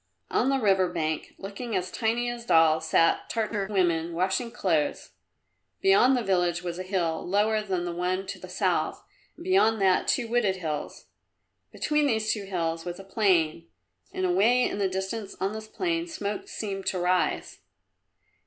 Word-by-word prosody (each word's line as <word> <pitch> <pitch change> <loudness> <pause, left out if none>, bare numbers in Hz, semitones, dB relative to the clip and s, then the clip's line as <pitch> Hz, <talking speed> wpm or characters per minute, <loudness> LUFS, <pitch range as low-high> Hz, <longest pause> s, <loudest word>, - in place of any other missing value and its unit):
On 255 - +2
the 275 - +2
river 190 -6 +2
bank, 155 -3 -3
looking 205 +3 -5
as 185 -1 -2
tiny 235 +1 0
as 240 -1 -4
dolls, 160 -4 +4
sat 165 +1 +2
Tartar 215 -3 -1
women, 170 -4 +1
washing 190 +7 0
clothes. 165 -9 -1 0.7
Beyond 385 -10 +5
the 245 - -1
village 175 -3 +1
was 175 0 -4
a - - -2
hill, 180 -4 -1
lower 210 +3 +1
than 185 -4 -2
the 175 - -3
one 180 +2 -1
to - - -6
the - - -10
south - - -1 0.3
and - - -10
beyond 355 - +3
that 190 -2 +3
two 240 -3 +1
wooded 225 -5 +1
hills. 155 -5 -5 0.7
Between 300 -1 +1
these 220 -4 +1
two 205 -2 -5
hills 165 -3 -2
was 175 0 -6
a - - -8
plain 180 -5 +1 0.4
and 185 - -2
away 215 +8 +3
in 205 - -1
the 195 -1 +1
distance 190 +2 -4
on 195 +2 -1
this 220 0 -7
plain 335 +5 -2
smoke 210 - -4
seemed 195 -3 -5
to 190 - 0
rise. 180 +1 0
195 Hz, 170 wpm, -27 LUFS, 175-225 Hz, 0.7 s, Beyond